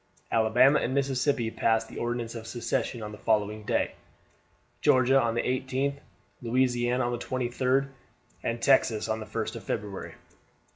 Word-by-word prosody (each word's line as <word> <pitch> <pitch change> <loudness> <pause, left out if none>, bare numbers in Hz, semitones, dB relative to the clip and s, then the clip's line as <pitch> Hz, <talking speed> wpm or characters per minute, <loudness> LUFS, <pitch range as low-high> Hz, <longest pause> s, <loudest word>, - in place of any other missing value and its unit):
Alabama 120 +6 +5
and 130 - -1
Mississippi 135 -3 +1
passed 115 0 +1
the - - -8
Ordinance 120 -1 -2
of 115 -1 -7
Secession 120 0 -2
on 105 - -6
the 105 - -10
following 105 -1 0
day; 105 - 0 0.9
Georgia 135 -2 +4
on 115 -1 0
the 120 - 0
18th, 130 +2 -1 0.4
Louisiana 125 0 +1
on 120 - -1
the 120 - -3
23d, 130 +2 0 0.5
and 115 0 -2
Texas 120 -5 +3
on 110 0 -1
the 110 - -7
1st - - -3
of - - -9
February. 100 -2 -5
120 Hz, 150 wpm, -28 LUFS, 115-130 Hz, 0.9 s, Alabama